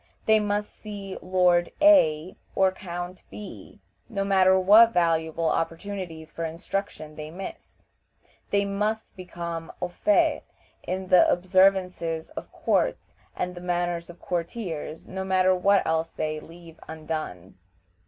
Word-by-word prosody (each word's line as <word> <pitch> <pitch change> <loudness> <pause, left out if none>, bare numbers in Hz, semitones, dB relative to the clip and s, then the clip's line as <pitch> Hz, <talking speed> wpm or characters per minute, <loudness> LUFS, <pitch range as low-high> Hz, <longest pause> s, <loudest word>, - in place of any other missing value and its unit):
They 220 0 +5
must 205 0 -1
see 200 -3 -8
Lord 180 -1 +2
A 185 - +5 0.2
or 190 -1 +4
Count 175 -1 -7
B, 210 - -10 0.3
no 200 -4 -2
matter 190 -1 +4
what 220 +5 +7
valuable 165 -1 +1
opportunities 165 -1 -3
for 165 - -5
instruction 165 -1 -4
they 150 0 -7
miss. 185 +4 -9 0.7
They 200 0 +2
must 210 +2 -2
become 170 -3 -6
au 180 - -2
fait 310 - +2 0.4
in 185 0 -4
the 180 - +6
observances 180 -3 +2
of - - -8
courts - - -1 0.2
and 180 0 -3
the 175 - -9
manners 175 -1 -2
of 175 - -12
courtiers, 170 -3 -4
no 190 0 -4
matter 185 0 +3
what 195 +2 +3
else 160 0 0
they 155 0 -3
leave 165 0 -14
undone. 155 - -6
180 Hz, 130 wpm, -26 LUFS, 165-195 Hz, 0.7 s, what